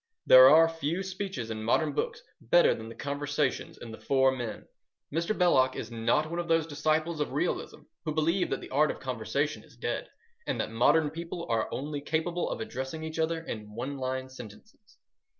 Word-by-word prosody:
There 130 Hz, 0 st, +10 dB
are 160 Hz, +3 st, +7 dB
few 165 Hz, +3 st, -2 dB
speeches 190 Hz, -, -5 dB
in 110 Hz, 0 st, -4 dB
modern 150 Hz, +6 st, +2 dB
books -, -, -3 dB, 0.2 s
better 175 Hz, +9 st, +5 dB
than 110 Hz, 0 st, -8 dB
the 115 Hz, -, -10 dB
conversations 145 Hz, -1 st, -2 dB
in 115 Hz, -, -9 dB
The 110 Hz, -, -9 dB
Four 135 Hz, -1 st, +3 dB
Men. 120 Hz, -5 st, -5 dB, 0.5 s
Mr. 170 Hz, +7 st, -1 dB
Belloc 130 Hz, -8 st, +4 dB
is 110 Hz, -, -6 dB
not 115 Hz, +7 st, +1 dB
one 170 Hz, +2 st, -4 dB
of 170 Hz, -, -3 dB
those 165 Hz, -2 st, +3 dB
disciples 155 Hz, +1 st, 0 dB
of 150 Hz, -, -2 dB
realism -, -, -2 dB, 0.2 s
who 155 Hz, -, -1 dB
believe 165 Hz, +4 st, +1 dB
that 135 Hz, -, -2 dB
the -, -, -10 dB
art 150 Hz, +3 st, +3 dB
of -, -, -4 dB
conversation 130 Hz, +3 st, -2 dB
is -, -, -20 dB
dead, -, -, -3 dB, 0.4 s
and -, -, -1 dB
that -, -, -2 dB
modern 145 Hz, +7 st, +3 dB
people 170 Hz, +1 st, -6 dB
are 115 Hz, -1 st, 0 dB
only 145 Hz, +1 st, -4 dB
capable 160 Hz, +4 st, -1 dB
of -, -, -4 dB
addressing 160 Hz, -8 st, -5 dB
each 160 Hz, 0 st, -5 dB
other 160 Hz, 0 st, 0 dB
in 105 Hz, -5 st, -7 dB
one 130 Hz, +5 st, -4 dB
line 130 Hz, 0 st, -3 dB
sentences. 130 Hz, -, -14 dB
145 Hz, 190 wpm, -29 LUFS, 130-165 Hz, 0.5 s, There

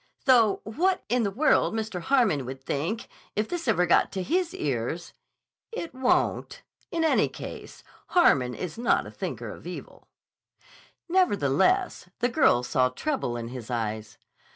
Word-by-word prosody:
Though 235 Hz, -6 st, +5 dB
what 355 Hz, -, 0 dB
in 245 Hz, +1 st, +2 dB
the 205 Hz, -, +1 dB
world 235 Hz, +1 st, +2 dB
Mr. 220 Hz, -5 st, -3 dB
Harmon 220 Hz, -, +2 dB
would 130 Hz, +1 st, -7 dB
think, 170 Hz, -, -2 dB, 0.3 s
if 210 Hz, +1 st, 0 dB
this 345 Hz, -5 st, -4 dB
ever 180 Hz, -6 st, +3 dB
got 170 Hz, -, +3 dB
to 190 Hz, -2 st, -2 dB
his 350 Hz, -, 0 dB
ears—" 135 Hz, +4 st, -3 dB, 0.6 s
"It 340 Hz, -, -5 dB
won't. 260 Hz, -1 st, 0 dB, 0.3 s
In 330 Hz, -1 st, -1 dB
any 320 Hz, -, +3 dB
case, -, -, -9 dB, 0.2 s
Harmon 130 Hz, -, +3 dB
is 180 Hz, +4 st, -6 dB
not 240 Hz, -, +2 dB
a -, -, -9 dB
thinker -, -, -5 dB
of -, -, -11 dB
evil." -, -, -9 dB, 1.0 s
Nevertheless 360 Hz, -, +2 dB
the 245 Hz, +1 st, +1 dB
girl 235 Hz, -, +3 dB
saw 125 Hz, +1 st, +2 dB
trouble 125 Hz, -, -2 dB
in 115 Hz, 0 st, -5 dB
his 125 Hz, -2 st, -8 dB
eyes. 110 Hz, -2 st, -3 dB
210 Hz, 150 wpm, -27 LUFS, -, 1.0 s, Though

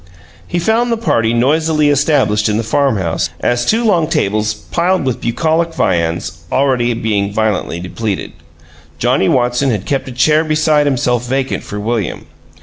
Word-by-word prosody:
He 175 Hz, -, -2 dB
found 225 Hz, +7 st, +1 dB
the 230 Hz, -, +1 dB
party 115 Hz, -, +1 dB
noisily 150 Hz, +5 st, +2 dB
established 135 Hz, -8 st, +2 dB
in 105 Hz, -, 0 dB
the 115 Hz, -, -1 dB
farm 130 Hz, +2 st, +1 dB
house 85 Hz, -3 st, -1 dB
at 120 Hz, -, 0 dB
two 220 Hz, -, +1 dB
long 175 Hz, -7 st, +2 dB
tables 105 Hz, -6 st, 0 dB
piled 170 Hz, -, -1 dB
with 130 Hz, -3 st, -2 dB
bucolic 160 Hz, +7 st, 0 dB
viands 85 Hz, -1 st, -1 dB
already 125 Hz, -3 st, +1 dB
being 105 Hz, -3 st, -1 dB
violently 105 Hz, -5 st, -1 dB
depleted. 95 Hz, +3 st, -4 dB, 0.7 s
Johnnie 95 Hz, -, +1 dB
Watson 125 Hz, +2 st, +1 dB
had 105 Hz, -5 st, -2 dB
kept 140 Hz, -1 st, -2 dB
a -, -, -6 dB
chair 150 Hz, +5 st, +3 dB
beside 155 Hz, -1 st, +2 dB
himself 125 Hz, -3 st, 0 dB
vacant 135 Hz, +1 st, -1 dB
for 105 Hz, -, -7 dB
William. 110 Hz, -2 st, -3 dB
125 Hz, 155 wpm, -15 LUFS, 105-155 Hz, 0.7 s, chair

